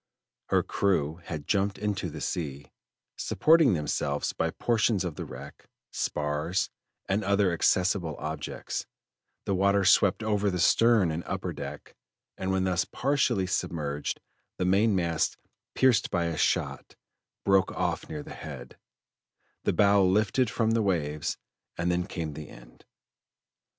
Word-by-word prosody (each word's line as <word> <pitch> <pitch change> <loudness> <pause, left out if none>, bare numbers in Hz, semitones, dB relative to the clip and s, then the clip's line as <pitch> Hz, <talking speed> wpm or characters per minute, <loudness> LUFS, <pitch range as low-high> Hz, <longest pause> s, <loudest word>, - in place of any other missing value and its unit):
Her - - +2
crew 80 -6 0
had 75 -3 -5
jumped 100 +2 +1
into 105 -1 -2
the - - -8
sea, 70 -4 -4 0.5
supporting 160 - +4
themselves 75 -1 -1
by - - 0
portions 110 -4 +1
of 85 - -3
the - - -6
wreck, - - -11 0.2
spars, 75 +5 -1 0.4
and 100 +2 0
other 100 -1 +2
accessible 90 -2 +1
objects, 80 +1 -5 0.6
the 100 - 0
water 100 +1 +3
swept 100 +3 +4
over 105 -2 +1
the 90 - -2
stern 110 -1 +4
and 80 +2 -3
upper - - -3
deck, - - -8 0.4
and 95 0 -2
when 95 0 +1
thus 90 -1 +1
partially 130 -7 +1
submerged, 75 -6 -2 0.4
the 90 - -1
mainmast, 95 -4 +2 0.4
pierced 130 -3 +3
by 85 -2 0
a 85 -1 -2
shot, - - -1 0.5
broke 95 -1 +4
off - - -2
near 75 -2 -5
the - - -9
head, 65 -5 -9 0.9
the - - +3
bow 100 -1 +5
lifted 105 +6 +2
from 115 0 +1
the 115 0 +2
waves, 75 -7 -1 0.4
and 85 +1 0
then 90 +1 -1
came 80 -6 -4
the 75 0 -8
end. - - -16
95 Hz, 140 wpm, -28 LUFS, 80-100 Hz, 0.9 s, bow